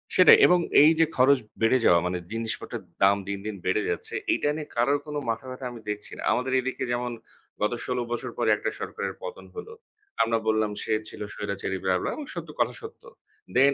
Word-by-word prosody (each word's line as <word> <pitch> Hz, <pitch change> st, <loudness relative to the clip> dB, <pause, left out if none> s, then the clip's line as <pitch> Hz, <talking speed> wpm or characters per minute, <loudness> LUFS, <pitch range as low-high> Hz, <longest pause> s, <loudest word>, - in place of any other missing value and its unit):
সেটাই 185 Hz, -, +9 dB
এবং 180 Hz, 0 st, +5 dB, 0.2 s
এইযে 160 Hz, +2 st, +6 dB
খরচ 130 Hz, +1 st, +5 dB, 0.2 s
বেড়ে 115 Hz, +3 st, +4 dB
যাওয়া, 85 Hz, -, +6 dB
মানে 90 Hz, 0 st, -1 dB
জিনিসপত্রের 115 Hz, 0 st, -4 dB, 0.2 s
দাম 100 Hz, +1 st, +6 dB
দিন, 100 Hz, 0 st, -2 dB
দিন 110 Hz, -1 st, -3 dB
বেড়ে 95 Hz, +3 st, +2 dB
যাচ্ছে। 450 Hz, 0 st, -4 dB, 0.2 s
এইটা 145 Hz, -, 0 dB
নিয়ে 155 Hz, -1 st, -5 dB
কারোর 135 Hz, +5 st, +3 dB
কোনো 150 Hz, -1 st, -3 dB
মাথাব্যথা 130 Hz, +3 st, -4 dB
আমি 115 Hz, -2 st, -10 dB
দেখছি 105 Hz, 0 st, -5 dB
না। -, -, -8 dB
আমাদের 125 Hz, +1 st, 0 dB
এদিকে 130 Hz, 0 st, -3 dB
যেমন 120 Hz, 0 st, -1 dB, 0.5 s
গত 105 Hz, +3 st, +1 dB
১৬ 125 Hz, 0 st, -2 dB
বছর 120 Hz, -, -3 dB
পরে -, -, +1 dB
একটা -, -, -2 dB
সরকারের -, -, -4 dB
পতন -, -, -7 dB
হলো। 445 Hz, +1 st, -8 dB, 0.5 s
আমরা 115 Hz, 0 st, +2 dB
বললাম, 110 Hz, -1 st, +2 dB
সে -, -, -4 dB, 0.2 s
ছিল -, -, -11 dB
স্বৈরাচারী 100 Hz, -2 st, -3 dB
ব্লাহ, 95 Hz, -1 st, +2 dB
ব্লাহ -, -, -2 dB
এবং 300 Hz, -, -6 dB
সত্য, -, -, -6 dB
কথা -, -, +2 dB
সত্য। 440 Hz, +2 st, -11 dB, 0.5 s
দেন 140 Hz, +2 st, +6 dB
125 Hz, 190 wpm, -26 LUFS, 105-145 Hz, 0.5 s, সেটাই